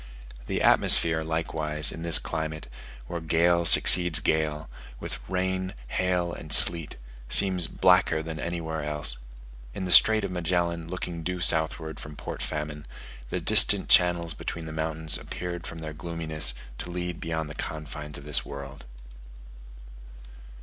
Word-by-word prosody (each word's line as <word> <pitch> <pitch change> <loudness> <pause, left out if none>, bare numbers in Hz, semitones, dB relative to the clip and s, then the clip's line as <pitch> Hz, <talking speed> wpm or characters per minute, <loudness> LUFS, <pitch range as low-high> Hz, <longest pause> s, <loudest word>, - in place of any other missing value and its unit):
The - - -3
atmosphere, 80 -1 +2
likewise, 80 -2 -3
in 80 - -10
this 85 -1 +4
climate, 80 0 -6 0.4
where 85 +6 -7
gale 85 +2 0
succeeds 90 -1 +8
gale, 80 0 -2 0.3
with - - -7
rain, 95 0 -3
hail, 90 -2 -2
and 75 - -11
sleet, 80 -3 +2 0.3
seems 95 -3 +4
blacker 90 -4 +1
than 80 -1 -8
anywhere 80 -1 -5
else. 75 -4 -2 0.6
In 95 - -5
the 90 - -4
Strait 110 +3 +6
of 100 - -5
Magellan 85 -1 -3
looking 85 -1 -7
due 90 +2 -5
southward 80 -2 +1
from 75 0 -11
Port - - -9
Famine, 75 -1 -6 0.4
the - - -4
distant - - +7
channels 85 -2 +3
between 85 +2 -8
the 80 - -9
mountains 80 0 -1
appeared 85 -1 -8
from 85 - -9
their 80 -1 -8
gloominess 80 -4 -6 0.2
to - - -8
lead 90 -1 -6
beyond 80 -1 -5
the 75 - -9
confines 75 0 -8
of 70 - -12
this 75 -2 -1
world. 70 0 -11
80 Hz, 145 wpm, -25 LUFS, 75-85 Hz, 0.6 s, succeeds